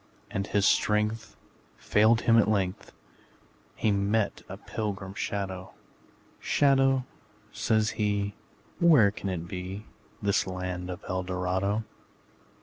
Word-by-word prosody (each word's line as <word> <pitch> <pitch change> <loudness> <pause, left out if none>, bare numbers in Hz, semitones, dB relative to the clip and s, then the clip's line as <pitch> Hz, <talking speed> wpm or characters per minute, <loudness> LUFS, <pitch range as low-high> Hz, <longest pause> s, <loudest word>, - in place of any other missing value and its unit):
And, 100 +1 -2
as - - -13
his 100 -1 +3
strength 105 +1 +1 0.4
Failed 110 +2 +3
him 115 - +4
at 110 - +3
length, 95 -3 -1 0.8
He 110 - +1
met 100 +1 0
a - - -6
pilgrim 100 -3 -5
shadow: 95 -1 -4 0.7
``Shadow,'' 135 -2 +3 0.5
says 110 -1 +1
he, 100 -1 0 0.5
``Where 130 -13 +6
can 100 - -4
it 85 -2 -4
be, 95 +4 -6 0.3
This 100 -2 +1
land 90 -1 -4
of 90 +2 -6
Eldorado?'' 95 +3 -1
100 Hz, 115 wpm, -28 LUFS, 95-110 Hz, 0.8 s, ``Where